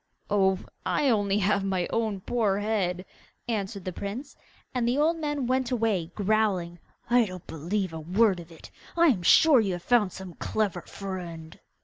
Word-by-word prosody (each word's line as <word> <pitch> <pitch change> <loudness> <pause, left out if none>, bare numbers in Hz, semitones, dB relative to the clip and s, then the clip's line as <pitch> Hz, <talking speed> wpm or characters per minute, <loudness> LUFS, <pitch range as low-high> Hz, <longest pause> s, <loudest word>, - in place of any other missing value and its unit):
'Oh, 190 -2 +3 0.3
I - - 0
have 260 -5 +4
only 205 -1 0 0.2
my 190 -2 0
own 220 -4 -1
poor 210 -3 0
head,' 195 -4 -1 0.4
answered 200 -4 -3
the 185 - -3
prince, 220 - -6 0.4
and 245 -2 0
the 245 +3 +1
old 320 +3 +2
man 295 -4 -2
went 255 0 0
away 220 -9 0
growling, 200 -5 0 0.3
'I 245 -1 +5
don't 185 -2 -9
believe 180 +4 -3
a 160 - -5
word 185 +4 +2
of 170 0 -11
it! 165 - -13 0.3
I 340 -1 +6
am 210 -10 +1
sure 290 - +6
you 200 -4 0
have 175 -1 -6
found 225 -6 +3
some 190 -1 -9
clever 200 -3 -2
friend! 175 -5 -7
200 Hz, 170 wpm, -27 LUFS, 180-235 Hz, 0.4 s, I